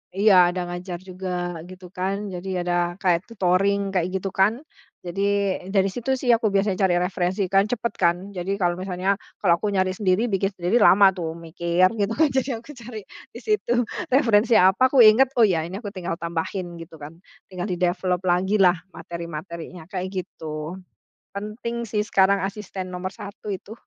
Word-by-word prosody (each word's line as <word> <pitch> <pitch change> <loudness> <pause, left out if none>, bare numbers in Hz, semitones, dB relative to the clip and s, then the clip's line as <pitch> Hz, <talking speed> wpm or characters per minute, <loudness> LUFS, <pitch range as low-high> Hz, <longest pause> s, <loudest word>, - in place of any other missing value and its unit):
iya 205 0 +5 0.2
ada 180 - -1
ngajar 175 0 -6
juga 180 -2 -4
gitu 185 0 -11
kan, 195 +3 -3
jadi 180 0 -3
ada 175 - +1 0.2
kayak 180 -2 +2
tutoring 195 0 +1
kayak 175 -2 +2
gitu 190 0 -2
kan. 200 +6 +2 0.5
Jadi 190 +3 -2 0.5
dari 195 -1 +3
situ 245 +6 -2
sih 250 - -2
aku 220 -3 0
biasanya 195 -1 +1
cari 180 - +2
referensi 180 +1 -1
kan 195 +1 +4
cepet 235 -2 -2
kan, 170 -2 +3 0.2
jadi 180 +2 -3
kalo 175 -2 +1
misalnya, 185 +1 -1 0.3
kalo 175 -4 +4
aku 210 +3 -2
nyari 185 -1 +2
sendiri 200 +3 +1
bikin 195 0 0
sendiri 180 +5 +1
lama 195 +1 +7
tuh 165 -4 -3
mikir 170 +2 +1
gitu, 205 +1 0
kan 315 - +6
jadi 265 -3 -1
aku 240 - -20
cari 235 -2 -8 0.3
di - - -8
situ 425 - -1 0.4
referensi 235 -4 +4
apa 190 +8 +4
aku 270 - +5
inget 230 +4 +7
oh 225 - +7
ya 165 -5 0
ini 185 +4 -6
aku 210 - -5
tinggal 175 -2 -4
tambahin 170 +2 -4
gitu 165 -1 -11
kan 155 +3 -9 0.3
tinggal 180 -2 -5
di-develop 180 0 0
lagi 190 +4 +2
lah 180 -1 +6 0.2
materi-materinya 170 0 -8
kayak 185 -2 -3
gitu. 155 0 -7 0.6
Penting 225 +3 -5
sih 210 0 0
sekarang 195 +1 +3
asisten 195 -1 -5
nomor 180 +1 -4
1 200 +2 -10
itu. 195 +2 -6
190 Hz, 175 wpm, -23 LUFS, 175-205 Hz, 0.6 s, lama